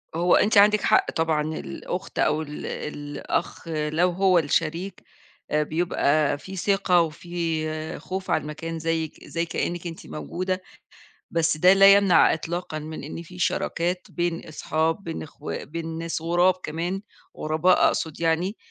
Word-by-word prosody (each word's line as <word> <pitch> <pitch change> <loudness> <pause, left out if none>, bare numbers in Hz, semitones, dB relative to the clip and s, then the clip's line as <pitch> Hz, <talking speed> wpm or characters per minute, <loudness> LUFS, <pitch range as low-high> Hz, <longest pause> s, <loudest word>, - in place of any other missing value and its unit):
هو 175 +2 +4
أنتِ 210 0 +3
عندِك 210 +1 +6
حق - - +3
طبعًا، 160 -2 +1
الأخت 150 - -5
أو 155 +1 +2
ال 150 -1 -7
الأخ 145 +2 -4
لو 155 +2 +1
هو 185 0 +3
الشريك 165 +5 -1 0.5
آآ، 150 0 +3
بيبقى 155 -2 +1
في 190 +6 -9
ثقة 190 -1 +3
وفي 160 -1 -3
خوف 190 0 -5
على - - +2
المكان 165 +2 -5
زيك 160 -1 -2
زي 170 0 -2
كأنِك 170 +1 -3
أنتِ 165 -1 -9
موجودة، 185 +4 -3 0.7
بس 165 -2 +1
ده 180 +4 +6
لا 195 0 +8
يمنع 200 -3 +5
إطلاقًا 165 0 -4
من 155 -1 -7
إن 155 +3 -6
في 180 +2 -13
شراكات 180 0 -1
بين 175 -1 -2
أصحاب، 160 +3 -1
بين 165 -1 -5
إخو 150 0 -8
بين 165 0 -5
ناس 165 -1 -3
غراب 175 +2 +3
كمان، 170 +5 -3 0.4
غرباء 160 +4 +3
أقصد 160 -2 -1
يعني 170 +5 +1
165 Hz, 145 wpm, -25 LUFS, 155-180 Hz, 0.7 s, لا